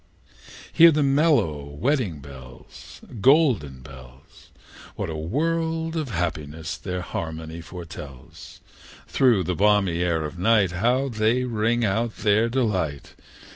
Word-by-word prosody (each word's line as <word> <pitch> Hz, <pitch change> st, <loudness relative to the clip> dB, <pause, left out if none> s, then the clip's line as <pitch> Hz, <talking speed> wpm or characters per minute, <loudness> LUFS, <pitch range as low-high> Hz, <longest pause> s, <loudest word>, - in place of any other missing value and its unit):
II. -, -, -30 dB, 0.4 s
Hear 170 Hz, 0 st, +8 dB
the 150 Hz, -1 st, +1 dB
mellow 135 Hz, -, +2 dB
wedding 90 Hz, -, -2 dB
bells, 65 Hz, -2 st, -13 dB, 0.2 s
Golden 125 Hz, -, +3 dB
bells! 65 Hz, 0 st, -15 dB, 0.5 s
What -, -, -4 dB
a -, -, -5 dB
world 160 Hz, -, -2 dB
of 155 Hz, -5 st, -2 dB
happiness 80 Hz, -3 st, -4 dB
their 90 Hz, 0 st, -5 dB
harmony 80 Hz, -1 st, -6 dB
foretells! 85 Hz, -7 st, -11 dB, 0.5 s
Through 120 Hz, -8 st, +3 dB
the 90 Hz, +2 st, -2 dB
balmy 95 Hz, -2 st, +2 dB
air 85 Hz, -3 st, 0 dB
of 75 Hz, +3 st, -7 dB
night 100 Hz, -2 st, +3 dB
How 120 Hz, +9 st, +1 dB
they 115 Hz, +1 st, +1 dB
ring 115 Hz, 0 st, 0 dB
out 110 Hz, +3 st, -1 dB
their 110 Hz, +2 st, +2 dB
delight! 95 Hz, -, -2 dB
95 Hz, 125 wpm, -24 LUFS, 80-125 Hz, 0.5 s, Hear